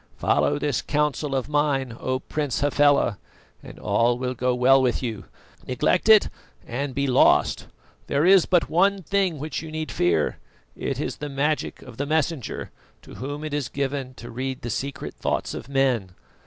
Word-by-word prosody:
"Follow 145 - +2
this 145 -3 -1
counsel 150 -1 -1
of 130 -1 -1
mine, 145 -5 0
O 130 0 -1
Prince 145 -4 -2
Hafela, 145 -6 +3 0.4
and - - -12
all 120 +1 +1
will 125 0 -2
go 125 0 0
well 130 +2 +5
with 125 0 0
you. 110 -6 -4 0.4
Neglect 150 - +1
it 215 -2 +7 0.4
and 130 +2 -4
be 140 0 0
lost. 130 -2 +3 0.4
There 145 +3 +1
is 190 -1 +6
but 175 -2 +3
one 195 +3 +2
thing 190 -2 0
which 150 +2 -4
you 160 - -8
need 155 0 -4
fear 85 -3 +1 0.4
it - - -3
is - - -3
the 150 - -5
magic 145 +2 -1
of 125 -3 -12
the 140 - -2
Messenger, 155 -3 -1 0.3
to - - -13
whom 145 +7 -6
it 155 -1 -5
is 145 -4 -2
given 135 -2 -3
to 120 -1 -10
read 130 +2 -4
the 120 - -3
secret 140 +5 -4
thoughts - - -2
of 125 - -7
men. 130 -8 +1
140 Hz, 175 wpm, -24 LUFS, 125-150 Hz, 0.4 s, it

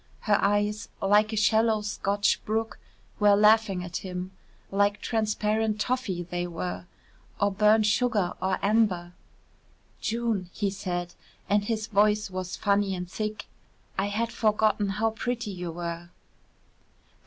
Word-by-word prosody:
Her 205 -2 +2
eyes, 205 +1 +1
like 210 +2 +3
a - - -2
shallow 220 0 +3
Scotch 205 -1 0
brook, 220 0 -2 0.4
were 205 -1 +6
laughing 210 -3 +4
at 175 0 -4
him: 180 0 -5 0.4
like 205 +1 +2
transparent 215 -1 0
toffee 230 -7 -1
they 175 0 -3
were 175 +1 -5 0.5
or 200 0 +2
burnt 210 +2 +4
sugar 210 -4 +1
or 190 0 +1
amber. 200 -5 +2 0.9
"June," 225 -5 -1
he 200 -2 -1
said, 175 -2 -4 0.3
and 205 0 +2
his 220 -1 -1
voice 210 -1 +2
was 185 -1 -4
funny 200 -1 +1
and 180 0 -6
thick, 215 0 -4 0.5
"I 195 +1 0
had 225 +3 -1
forgotten 215 -2 +1
how 220 +3 0
pretty 240 -1 -3
you 180 -2 -5
were." 170 0 -5
205 Hz, 130 wpm, -27 LUFS, 185-215 Hz, 0.9 s, were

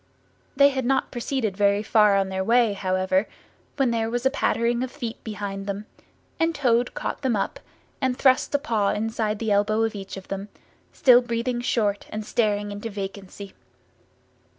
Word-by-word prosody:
They 280 +1 +6
had 265 -2 -2
not 265 +2 0
proceeded 240 -4 -2
very 200 +1 +2
far 210 -2 +4
on 195 -1 0
their 190 0 -2
way, 230 0 +3
however, 185 0 0 0.5
when 270 -4 +2
there 225 -1 0
was 245 +2 -2
a 265 - +4
pattering 235 -3 +1
of 255 - -2
feet 235 -6 -6
behind 200 -2 -5
them, 200 +1 -4 0.5
and 330 0 +1
Toad 245 -4 +1
caught - - -4
them 260 -5 +1
up 195 - -2 0.4
and 260 -2 0
thrust 260 +1 +3
a - - +6
paw 225 -9 0
inside 220 0 -1
the 220 0 -2
elbow 210 +2 +2
of 225 - 0
each 195 -1 -7
of 190 - -10
them; 195 +1 -5 0.4
still 250 -2 +6
breathing 240 0 -2
short 210 -4 0
and 215 0 -5
staring 205 -2 0
into 205 +3 -5
vacancy. 200 -1 -7
220 Hz, 175 wpm, -24 LUFS, 200-245 Hz, 0.5 s, They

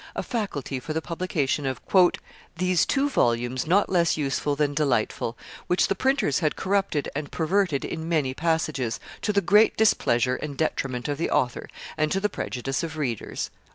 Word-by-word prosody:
a - - -2
faculty 150 - -3
for 155 +5 -5
the 160 - 0
publication 160 -4 -1
of 130 -1 -2 0.8
"these 180 -1 +2
two 280 +1 +2
volumes 120 - 0
not 195 +5 +4
less 170 -3 +2
useful 145 0 -1
than 145 0 0
delightful, 125 -5 0 0.3
which 180 - +3
the - - +3
printers 260 - +1
had 155 -4 0
corrupted 195 -6 0
and 145 -1 -4
perverted 170 -3 +1
in 165 0 -5
many 150 -6 +1
passages, 155 -6 -1 0.2
to 210 - 0
the 200 -1 +2
great 210 +4 +4
displeasure 125 - +3
and 145 -3 -6
detriment 130 -5 -1
of 145 0 -2
the 170 - 0
author, 125 -1 0 0.3
and 155 0 +1
to 195 - +1
the 210 +1 0
prejudice 135 -4 -3
of 160 -1 -5
readers." 125 -8 -3
155 Hz, 170 wpm, -25 LUFS, 135-185 Hz, 0.8 s, not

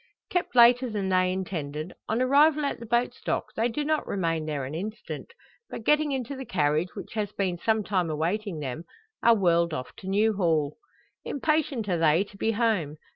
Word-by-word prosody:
Kept 355 -7 -1
later 245 +1 +6
than 205 -3 -2
they 185 0 +3
intended, 160 -4 -4 0.2
on 230 +3 +1
arrival 290 +3 +4
at 280 - -2
the 230 - -9
boat's 235 +2 0
dock - - -2
they 225 +2 +2
do 295 +5 -3
not 310 0 0
remain 165 -5 -1
there 145 -3 -2
an 135 - -6
instant; 210 +7 -6 0.4
but, - - -7
getting 300 0 +3
into 265 0 -3
the 265 - -6
carriage, 155 - 0
which - - -8
has 210 -2 -2
been 185 -3 -1
some 220 +2 +1
time 185 -4 0
awaiting 170 +3 -2
them, 140 +3 -4 0.4
are 235 0 +6
whirled 170 -4 +2
off 125 - -6
to 190 - -10
New 210 +3 +2
Hall. 160 -7 0 0.5
Impatient 285 -6 0
are 175 -3 0
they 160 +3 +4
to 205 - -16
be 220 +3 0
home. 205 -10 0
200 Hz, 190 wpm, -27 LUFS, 165-235 Hz, 0.5 s, later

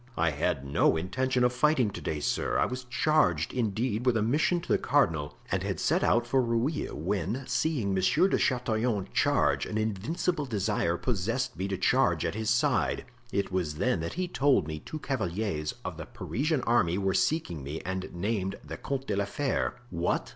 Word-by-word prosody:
"I 85 0 +2
had 75 -1 -1
no 70 +3 +3
intention 125 +9 0
of 125 0 +3
fighting 125 -4 +3
to - - -7
day, 75 - -2
sir; - - 0
I - - +3
was 125 0 -5
charged, 120 - +2
indeed, 115 0 -1
with 120 -2 +4
a 110 - +1
mission 160 +9 +2
to - - -11
the - - +2
cardinal 80 - +1
and - - +1
had - - -3
set - - +2
out 120 0 +3
for 130 +2 +2
Rueil, 120 +6 -1
when, 115 - -2
seeing 125 -4 0
Monsieur 95 - +3
de - - +1
Chatillon 115 -5 0
charge, - - +2
an 110 - -3
invincible 140 - -1
desire 100 -6 0
possessed 115 +4 -1
me 95 - -2
to 95 -1 -2
charge 95 - +2
at - - -1
his 110 +1 -2
side. 115 +1 +1 0.3
It 100 -1 -1
was 90 -5 -1
then 75 - +1
that 85 +1 -4
he 180 +1 -2
told 135 - +2
me 75 -1 -4
two 155 - -7
cavaliers 100 - -2
of - - -4
the - - -7
Parisian 145 +3 -1
army 90 -7 +2
were 95 -1 +1
seeking 95 - 0
me 75 +4 -5
and 95 0 -4
named 95 +1 -2
the - - -7
Comte 135 -1 -3
de 105 - -1
la 100 0 +1
Fere." 135 +7 -1 0.2
"What! 85 +1 -1
110 Hz, 190 wpm, -29 LUFS, 95-130 Hz, 0.3 s, with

